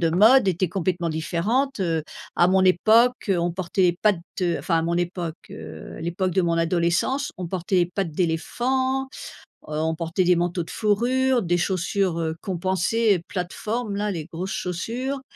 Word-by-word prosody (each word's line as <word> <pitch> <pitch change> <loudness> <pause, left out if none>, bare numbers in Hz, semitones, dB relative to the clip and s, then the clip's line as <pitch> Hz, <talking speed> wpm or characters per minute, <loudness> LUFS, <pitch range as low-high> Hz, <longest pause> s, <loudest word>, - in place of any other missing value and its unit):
de 165 -2 +2
mode 210 +6 +6
étaient 180 -1 +1
complètement 175 -1 -1
différentes, 205 - -1
heu. 165 -3 0 0.3
À 175 - +4
mon 190 0 +4
époque, 220 +7 +4
heu, 190 - +2
on 170 0 0
portait 180 -1 +1
pattes 205 -5 +4 0.4
enfin, 165 -2 0
à - - 0
mon 170 +1 0
époque, 175 -2 -2
heu, 80 -1 -9
à - - -8
l'époque 175 +2 -1
de 190 - +2
mon 170 -1 +1
adolescence, 175 - +1
on 180 -1 -5
portait 180 0 0
pattes 195 -4 -1
d'éléphant, 255 - 0
heu, - - -14 0.6
on 160 +1 -1
portait 165 +3 -1
des 180 0 +5
manteaux 175 0 -1
de - - -13
fourrure, 245 +4 +2
des 175 -3 +1
chaussures, 185 0 0
heu, 160 -1 -2
compensées, 190 +2 +1
plateformes, 210 +4 -3
là, 205 +1 -1
les 165 -5 -4
grosses 180 +3 -5
chaussures. 245 +10 -3
180 Hz, 170 wpm, -24 LUFS, 170-210 Hz, 0.6 s, mode